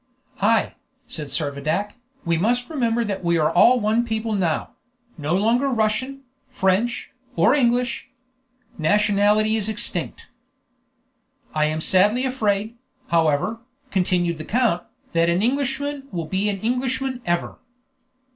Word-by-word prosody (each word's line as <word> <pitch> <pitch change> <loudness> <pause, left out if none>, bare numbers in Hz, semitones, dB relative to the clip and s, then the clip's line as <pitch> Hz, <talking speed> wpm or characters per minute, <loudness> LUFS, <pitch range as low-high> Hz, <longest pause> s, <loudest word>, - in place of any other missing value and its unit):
"Ay," - - +2 0.3
said 150 - -6
Servadac, 150 +7 -2 0.3
"we 170 0 +2
must 240 - 0
remember 235 -5 0
that 200 -3 -4
we 170 -1 +2
are 155 0 +2
all 245 +8 +6
one 220 +2 +1
people 220 -1 -2
now; 175 -6 -1 0.4
no 155 +2 -1
longer 235 +7 +2
Russian, 255 +4 -1 0.2
French, 200 +6 0 0.2
or 170 +9 +4
English. 245 -3 +1 0.7
Nationality 210 +4 +3
is 215 0 -1
extinct." 230 +2 -2 1.3
"I 155 0 +2
am 155 +1 -1
sadly 210 +10 +3
afraid, 220 -3 -1 0.3
however," 165 +7 +1 0.3
continued 175 -3 0
the - - -5
count, 225 -7 +1 0.3
"that 165 0 +2
an 175 +4 +1
Englishman 280 +2 -1
will 170 -2 -3
be 190 +5 0
an 195 -2 -3
Englishman 255 +2 -1
ever." 175 0 -1
210 Hz, 125 wpm, -22 LUFS, 170-240 Hz, 1.3 s, all